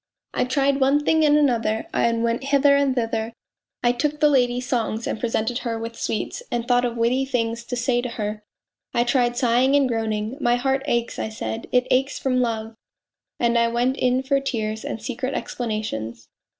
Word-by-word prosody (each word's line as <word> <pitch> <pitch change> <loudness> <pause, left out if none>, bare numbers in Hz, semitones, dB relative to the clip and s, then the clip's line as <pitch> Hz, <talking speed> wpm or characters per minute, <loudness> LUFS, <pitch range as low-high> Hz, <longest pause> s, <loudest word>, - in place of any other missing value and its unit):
I - - +1
tried 275 +2 +1
one 280 +2 +3
thing 320 0 +3
and 300 -1 +5
another, 230 -6 +1
and 230 0 +1
went 235 +3 -1
hither 280 0 +4
and 280 -2 +2
thither. 225 -1 -1 0.5
I 240 - +4
took 295 +5 -1
the 300 0 +5
lady 245 -3 +2
songs 235 -3 -2
and - - -3
presented 235 +1 -1
her 230 -2 -3
with 230 +1 -6
sweets 220 - -3
and 240 0 -2
thought 245 0 +3
of 240 -1 -3
witty 240 +3 +2
things 235 -3 -2
to 245 - -4
say 245 0 +1
to 250 - -4
her. 210 -2 -4 0.5
I 235 - +4
tried 240 -1 +1
sighing 250 +3 +3
and 280 -2 +4
groaning. 225 0 -2
' - - -17
My 240 0 +3
heart 265 +2 0
aches,' 235 -3 -1
I - - -2
said, 110 - -5
' - - -33
it 250 0 +3
aches 265 +2 +2
from 255 -1 +1
love.' 225 -2 -2 0.7
And 235 0 +2
I 235 - +3
went 240 +3 +1
in 255 -1 +1
for 275 +1 +2
tears 220 -5 -3
and - - -4
secret 255 +3 -4
explanations. 210 - -4
245 Hz, 200 wpm, -23 LUFS, 230-265 Hz, 0.7 s, and